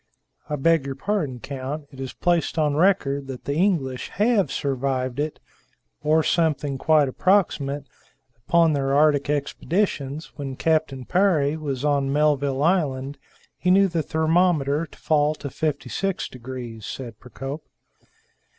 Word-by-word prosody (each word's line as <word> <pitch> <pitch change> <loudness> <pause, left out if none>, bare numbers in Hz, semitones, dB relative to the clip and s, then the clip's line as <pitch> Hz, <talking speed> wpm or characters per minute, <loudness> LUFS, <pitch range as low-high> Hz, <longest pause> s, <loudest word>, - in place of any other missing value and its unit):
"I 150 - 0
beg 155 0 +2
your 135 - -4
pardon, 145 -5 -2
count. 140 +3 -5
It 135 - -13
is 130 -1 -4
placed 175 -1 0
on 150 -2 +2
record 145 -6 +2
that 130 -2 -8
the 140 - -1
English 150 -7 0
have 210 -1 +2
survived 130 -1 -1
it, 150 +1 -2 0.6
or 155 +1 +3
something 150 -5 0
quite 155 -2 +4
approximate, 145 -4 +1 0.5
upon 160 +8 +3
their 135 -1 0
Arctic 145 -1 +3
expeditions. 150 0 -2
When 135 -3 -5
Captain 155 -4 0
Parry 160 -6 +2
was 145 -3 -3
on 140 -2 +1
Melville 145 -2 +1
Island, 145 -6 0 0.4
he 180 - 0
knew 195 +2 +6
the 170 -3 -1
thermometer 160 -2 +1
to - - -18
fall 150 -1 +2
to 140 -3 -7
56 160 +7 -2
degrees," 120 -3 -8
said 115 -2 -7
Procope. 135 +5 -7
145 Hz, 135 wpm, -24 LUFS, 135-160 Hz, 0.6 s, knew